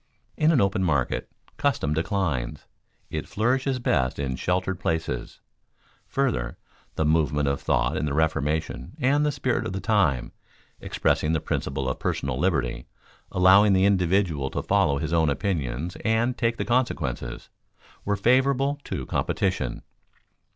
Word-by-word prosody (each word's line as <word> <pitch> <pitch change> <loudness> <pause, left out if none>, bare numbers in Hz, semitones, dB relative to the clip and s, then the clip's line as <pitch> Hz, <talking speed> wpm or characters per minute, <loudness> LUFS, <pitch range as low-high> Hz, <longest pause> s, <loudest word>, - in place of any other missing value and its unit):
In 155 +1 +3
an 150 - +4
open 100 -2 +1
market 70 -8 0 0.3
custom 140 - 0
declines; 80 - -2 0.5
it - - -4
flourishes 130 +4 0
best 70 - 0
in 65 -2 -2
sheltered 90 +5 -1
places. 80 0 -3 0.7
Further, 120 - -1 0.4
the 80 - 0
movement 75 -2 +2
of 70 0 -1
thought - - +1
in 75 - -1
the 70 - -2
Reformation 80 - -1
and 145 +2 +3
the 150 - +2
spirit 130 -3 -1
of 110 - -4
the 95 - -3
time, 90 - +1 0.5
expressing 75 +1 0
the 80 - +1
principle 70 -2 -2
of 65 - -2
personal 65 - -2
liberty, 65 -9 0 0.4
allowing 95 +3 +6
the 95 0 +4
individual 90 -7 +2
to - - -3
follow 70 -1 +2
his 80 +3 -3
own 80 -2 +3
opinions 75 -1 -2
and 115 +2 +1
take 115 -1 0
the - - -2
consequences, 120 - -1 0.5
were 105 - 0
favorable 135 +6 +2
to - - -4
competition. - - -1
90 Hz, 140 wpm, -25 LUFS, 70-115 Hz, 0.7 s, allowing